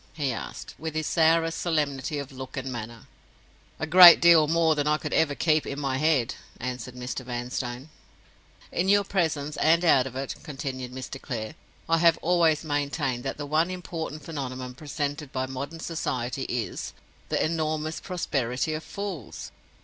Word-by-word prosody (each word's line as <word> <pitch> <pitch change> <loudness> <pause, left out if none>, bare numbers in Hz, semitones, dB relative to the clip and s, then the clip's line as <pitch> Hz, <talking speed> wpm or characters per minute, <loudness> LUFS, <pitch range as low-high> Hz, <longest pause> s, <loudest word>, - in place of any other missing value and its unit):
he 140 -5 -1
asked, - - -7
with 160 0 -5
his 155 0 -1
sourest 165 +1 +2
solemnity 150 -3 -1
of 140 -1 -5
look 130 0 -8
and 135 0 -3
manner. 115 -1 -7 0.7
"A - - -1
great 175 +1 +10
deal 170 -3 +6
more 165 0 +3
than 150 -1 -1
I 150 0 +3
could - - -5
ever 145 -3 +2
keep 155 +1 +2
in 140 - -4
my 135 -2 -1
head," 145 -6 +2 0.3
answered 125 0 -5
Mr. 125 +1 -5
Vanstone. 125 +2 -4 0.8
"In 185 +3 0
your 205 0 +5
presence 155 -7 -1
and 165 +2 +3
out 135 -5 +5
of 130 - -9
it," 135 +1 -3
continued 130 -3 -5
Mr. 130 +1 -7
Clare, 115 -4 -5 0.3
"I 165 0 +3
have 165 -1 +5
always 165 -3 +3
maintained 145 -4 -1
that 135 - -3
the 145 - -4
one 155 +4 +2
important 165 -4 -5
phenomenon 130 -5 -5
presented 145 0 -4
by 130 0 -1
modern 140 +5 -6
society 130 -6 -3
is—the 120 -3 -4
enormous 155 -1 -2
prosperity 145 -6 -2
of 155 +1 -4
Fools. 195 - -6
145 Hz, 160 wpm, -26 LUFS, 130-160 Hz, 0.8 s, great